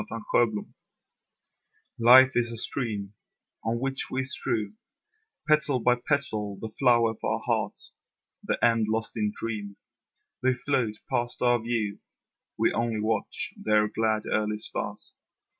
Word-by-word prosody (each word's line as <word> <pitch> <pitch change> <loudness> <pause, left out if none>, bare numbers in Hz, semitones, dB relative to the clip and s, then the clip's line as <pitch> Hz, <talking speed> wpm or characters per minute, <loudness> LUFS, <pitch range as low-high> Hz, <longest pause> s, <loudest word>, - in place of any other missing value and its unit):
Petals - - 0 1.3
Life 130 +3 +8
is 120 -1 0
a 115 - -4
stream 105 -5 -2 0.5
On 115 +1 -1
which 135 +1 -2
we 130 0 -2
strew 115 - 0 0.7
Petal 155 -3 +3
by 125 +1 +3
petal 120 -6 +2
the 110 - -6
flower 120 -2 +3
of 110 - -14
our - - 0
heart; - - -2 0.6
The - - -1
end 115 -2 +2
lost 110 +1 -1
in 105 -2 -1
dream, 105 -3 -6 0.6
They 130 0 +2
float 125 -5 -1 0.2
past 120 +1 -1
our 120 -1 +3
view, 110 -3 -2 0.6
We - - +2
only 115 -2 -1
watch 110 0 -2
their 105 0 +2
glad, 110 -1 0
early 105 0 -1
start. 105 - 0
115 Hz, 130 wpm, -27 LUFS, 110-125 Hz, 1.3 s, Life